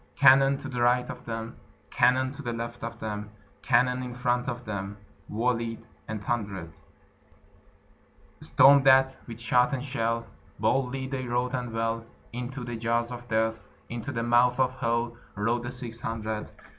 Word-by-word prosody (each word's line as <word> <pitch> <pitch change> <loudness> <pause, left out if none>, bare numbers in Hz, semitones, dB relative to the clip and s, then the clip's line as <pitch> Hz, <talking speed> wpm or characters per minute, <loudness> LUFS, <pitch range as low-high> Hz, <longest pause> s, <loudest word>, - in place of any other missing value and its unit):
Cannon 135 0 +6
to 145 - -7
the 125 -3 -3
right 125 +1 +3
of - - -11
them, 115 0 -5 0.3
Cannon 130 +1 +3
to 145 - -9
the 120 -4 -3
left 120 +1 -5
of 115 0 -5
them, 105 -2 -5 0.3
Cannon 125 0 +3
in 125 -1 -6
front 125 0 0
of 120 0 -5
them 100 -1 -4 0.3
Volleyed 115 0 -1 0.2
and 110 -2 -5
thunder'd; 100 -8 -3 1.7
Storm'd 140 0 +6
at 130 0 +6
with 115 -1 -8
shot 125 +3 +3
and 135 0 -2
shell, 115 -3 -1 0.3
Boldly 130 +4 +1
they 130 -1 -4
rode 125 +2 0
and 125 -2 -2
well, 115 0 -1 0.3
Into 125 +2 -5
the 120 -1 -4
jaws 115 +1 0
of 120 0 -8
Death, 110 0 0 0.2
Into 120 +4 -4
the 115 -3 -2
mouth 120 +1 +4
of 130 -1 +3
Hell, 120 0 0 0.2
Rode 115 +4 0
the 120 +1 -5
six 120 -2 -7
hundred. 110 -2 -3
120 Hz, 160 wpm, -28 LUFS, 115-125 Hz, 1.7 s, Cannon